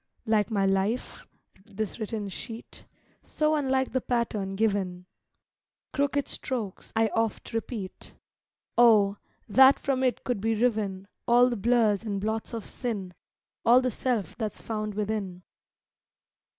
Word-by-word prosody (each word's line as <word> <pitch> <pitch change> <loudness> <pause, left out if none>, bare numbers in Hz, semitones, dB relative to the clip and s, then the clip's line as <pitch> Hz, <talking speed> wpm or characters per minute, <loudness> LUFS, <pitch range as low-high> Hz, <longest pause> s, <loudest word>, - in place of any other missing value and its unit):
Like 215 -2 +2
my 200 -3 +1
life, 195 +5 -1 0.4
this 215 +1 -5
written 215 -1 -3
sheet, 225 +4 -9 0.4
So 305 0 0
unlike 265 -3 +1
the 260 - 0
pattern 215 -6 -1
given; 195 -4 0 0.9
Crooked 285 0 0
strokes, 235 -9 -4
I 225 0 +3
oft 225 +1 -2
repeat; 225 -4 -5 0.6
Oh, 210 -4 +6 0.3
that 265 +5 +7
from 270 -2 -1
it 255 -2 0
could 245 -6 -2
be 225 +1 +1
riven 210 -4 0 0.2
All 245 +1 +5
the - - 0
blurs 225 -2 +2
and 205 -3 -2
blots 220 +2 -2
of 230 -3 -5
sin; 205 -7 -4 0.5
All 240 +2 +7
the 255 -1 0
self 235 -4 -1
that's 220 -3 -4
found 215 -2 -3
within. 205 -4 -3
220 Hz, 130 wpm, -27 LUFS, 200-245 Hz, 0.9 s, that